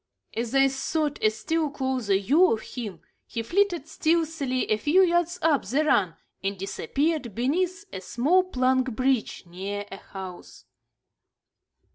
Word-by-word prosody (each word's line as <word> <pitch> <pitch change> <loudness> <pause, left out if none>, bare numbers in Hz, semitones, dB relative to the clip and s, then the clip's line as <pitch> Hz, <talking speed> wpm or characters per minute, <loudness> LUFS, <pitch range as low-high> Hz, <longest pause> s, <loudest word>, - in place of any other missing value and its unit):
As 235 +3 -2
I 270 0 +6
sought 290 +2 -1
a 215 - +5
still 310 +8 -1
closer 260 -7 0
view 295 - +4
of 220 - 0
him, 210 -9 -7 0.3
he 230 - -4
flitted 350 - +1
stealthily 315 -6 0
a 215 - +4
few 300 - +4
yards 345 0 +1
up 310 -4 +3
the 275 +10 0
run 190 - +2 0.3
and 195 0 -2
disappeared 275 - -2
beneath 360 - 0
a 185 - -5
small 285 - +2
plank 260 -5 +1
bridge 255 -2 0
near 195 +4 -5
a 195 - -6
house. 190 -2 -10
265 Hz, 140 wpm, -26 LUFS, 215-320 Hz, 0.3 s, I